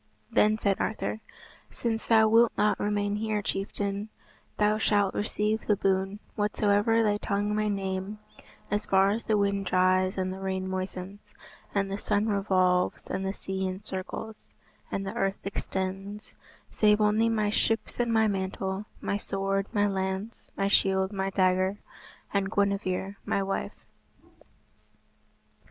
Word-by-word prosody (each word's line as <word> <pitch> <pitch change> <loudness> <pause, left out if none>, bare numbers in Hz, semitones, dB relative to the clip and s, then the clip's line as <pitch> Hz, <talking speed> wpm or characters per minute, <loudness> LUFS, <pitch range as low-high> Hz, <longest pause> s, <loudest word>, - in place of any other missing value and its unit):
Then 215 +1 +4
said 200 -3 +1
Arthur, 220 0 -2 0.5
"Since 225 -2 -3
thou 220 -1 +6
wilt 230 +1 +5
not 210 - +2
remain 205 0 0
here, 215 -1 -1
chieftain, 200 +1 -2 0.5
thou 210 +1 +2
shalt 205 -3 +2
receive 210 +1 -1
the 210 - +4
boon, 195 +1 0 0.2
whatsoever 210 +1 +2
thy 205 -1 +2
tongue 205 0 -1
may 215 0 +1
name, 195 0 -3 0.5
as 205 +1 -1
far 195 +1 +4
as 225 +3 -3
the 215 -2 +2
wind 200 -1 0
dries 185 +1 +3
and 185 0 -1
the 190 - -8
rain 190 -1 -2
moistens, 190 +1 -6 0.4
and 195 -1 +1
the 195 - -3
sun 205 +2 +1
revolves, 185 -3 +2
and 190 - -2
the 195 +1 -2
sea 190 0 -3
encircles, 190 +3 -5 0.3
and 195 - -3
the 195 - -4
earth 195 0 -2
extends, 195 +1 -4 0.4
save 210 0 +4
only 215 +2 +3
my 215 -2 +1
ships 225 +2 0
and 240 -1 +1
my 220 -1 +4
mantle, 190 0 -2
my 200 - -1
sword, 195 0 -1
my 205 -2 +2
lance, 190 +2 -3
my 195 - +1
shield, 190 0 +3
my 195 -1 -1
dagger, 185 +1 +2 0.6
and 200 0 0
Guinevere 200 -1 0
my 195 - 0
wife." 195 0 -4
200 Hz, 140 wpm, -28 LUFS, 190-210 Hz, 0.6 s, thou